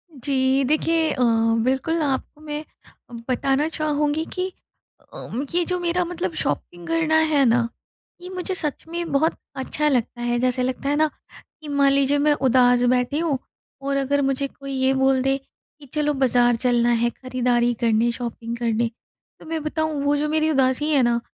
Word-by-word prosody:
जी, 265 0 +1
देखिए 315 +3 +2
अ, 255 - -2 0.4
बिल्कुल 265 +6 0
आपको 290 +1 -2
मैं 300 0 -5 0.7
बताना 275 +3 +1
चाहूँगी 305 -1 0
कि 365 0 -2 0.7
अ, - - -8 0.3
ये 350 - +3
जो 360 0 -1
मेरा 350 +1 +1
मतलब 325 - -3
शॉपिंग 170 +4 -4
करना 325 -1 +1 0.2
है 285 -2 +4
ना? 235 0 +3 0.5
ये 360 - -8
मुझे 370 0 -3
सच 300 -6 -2
में 340 -1 -4
बहुत 305 +4 +2 0.2
अच्छा 290 +3 -1
लगता 240 -3 -1
है 240 0 0
जैसे 255 0 +1
लगता 255 +2 -2
है 290 - +2
ना, 310 +1 +3 0.5
कि 305 - -10
मान 280 -1 +3
लीजिए 280 +1 +3
मैं 295 +1 +3
उदास 250 -3 +3
बैठी 250 +4 0
हूँ 320 -5 0 0.4
और 275 0 -1
अगर 280 +1 +1
मुझे 275 0 0
कोई 275 0 -10
ये 260 0 +2
बोल 265 0 +2
दे, 270 +1 +1 0.4
कि 285 - -13
चलो 295 -1 +1
बाज़ार 245 -3 +3
चलना 240 0 +2
है 240 - +3
खरीदारी 245 -1 0
करने 230 +1 +2
शॉपिंग 235 -1 -5
करने, 230 0 0 0.5
तो - - -14
मैं 320 -1 -3
बताऊँ 310 -1 -2
वो 285 +1 +2
जो 300 +1 -1
मेरी 315 0 +1
उदासी 270 +1 +2
है 280 - +4
ना? 235 0 +2
275 Hz, 175 wpm, -23 LUFS, 250-305 Hz, 0.7 s, है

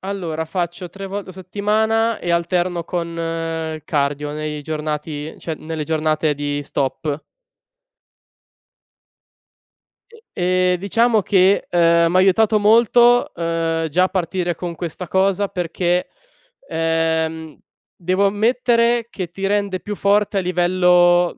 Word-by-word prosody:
Allora 175 -5 -4
faccio 175 +1 -4
3 195 +1 -8
volte 200 0 -6
a - - -11
settimana 215 +4 0
e 175 - -4
alterno 175 0 0
con 170 -1 -4 0.7
cardio 145 -1 -1
nei 150 0 -4
giornati 150 0 -4
cioè 165 - -5
nelle 155 -1 -5
giornate 155 -1 0
di 145 0 -3
stop. 140 +2 -3 2.9
E 460 -1 -17
ehm, 180 0 +1
diciamo 220 +3 +2
che, 190 0 +3
ehm, 170 -1 +3
mi 180 - +1
ha - - +6
aiutato 210 +3 +4
molto, 235 +3 +4
uhm, 165 -1 -1
già 180 +5 +2
a 185 - 0
partire 180 -1 -2
con 175 -1 -5
questa 175 +1 -6
cosa 195 +2 +1
perché, 180 -1 -1 0.6
ehm, 160 -1 -1 0.4
devo 185 +3 +1
ammettere 235 +2 +2
che 185 -6 -5
ti 195 +2 -4
rende 200 -2 0
più 210 - -5
forte 205 +1 +2
a - - +2
livello, 180 0 +3
180 Hz, 125 wpm, -20 LUFS, 165-200 Hz, 2.9 s, ha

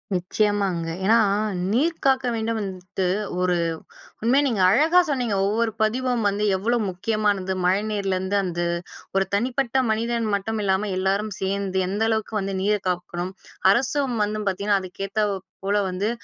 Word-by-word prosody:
நிச்சயமாங்க. 190 -2 0 0.2
ஏன்னா 220 +4 +5 0.5
"நீர் 315 +9 +1
காக்க 265 -1 +3
வேண்டும்" 225 0 -1
வந்துட்டு 185 -2 -4 0.4
ஒரு 180 -1 +2 0.7
உண்மையா 255 +6 +3
நீங்க 225 -7 0
அழகா 315 - +5
சொன்னீங்க. 245 -7 0
ஒவ்வொரு 225 +2 +1
பதிவும் 245 +2 +1
வந்து 205 +1 0
எவ்வளோ 225 +6 +1
முக்கியமானது. 200 0 0
மழை 190 +3 +3
நீரிலிருந்து 195 -1 -1
அந்த 175 -2 -3 0.6
ஒரு 195 0 +3
தனிப்பட்ட 245 +4 0 0.2
மனிதன் 230 +1 0
மட்டும் 215 +2 -1
இல்லாம 195 +1 +1
எல்லோரும் 195 +3 0
சேந்து 195 0 -1
எந்த 200 +3 -2
அளவுக்கு 220 -1 -1
வந்து 195 0 -3
நீரை 210 +1 +2
காக்கணும், 175 0 -2 0.4
அரசும் 260 +3 +1
வந்து 210 +1 -2
பார்த்தீங்கன்னா 200 +1 +1
அதுக்கேத்தாற் 195 +3 -2 0.3
போல 200 +1 +1
வந்து 190 +4 -1
205 Hz, 135 wpm, -24 LUFS, 190-230 Hz, 0.7 s, ஏன்னா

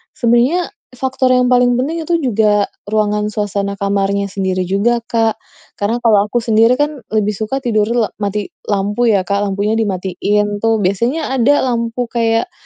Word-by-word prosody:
sebenernya 245 +9 +2 0.2
faktor 260 0 0
yang 250 0 +3
paling 245 -1 +3
penting 320 +6 -2
itu 335 +1 0
juga 215 -6 +2 0.2
ruangan 210 0 0
suasana 200 -1 -2
kamarnya 200 0 0
sendiri 190 -2 -2
juga, 210 +6 +1
Kak. 225 -1 0 0.4
Karena 205 +3 0
kalau 210 -3 +4
aku 240 +2 -1
sendiri 225 +1 +4
kan, 290 +1 -1 0.2
lebih 210 -1 +1
suka 220 +6 -4
tidurnya 225 -1 +1
le - - -22
mati 205 0 -3 0.2
lampu 205 +4 0
ya, 200 -4 +3
Kak, 200 +2 -1
lampunya 205 +2 -1
dimatiin 205 +1 -1
tuh. 225 -1 +1
Biasanya 235 - 0
ada 285 +5 +3
lampu 235 -1 -2
kayak, 230 +7 0
220 Hz, 155 wpm, -16 LUFS, 205-245 Hz, 0.4 s, kalau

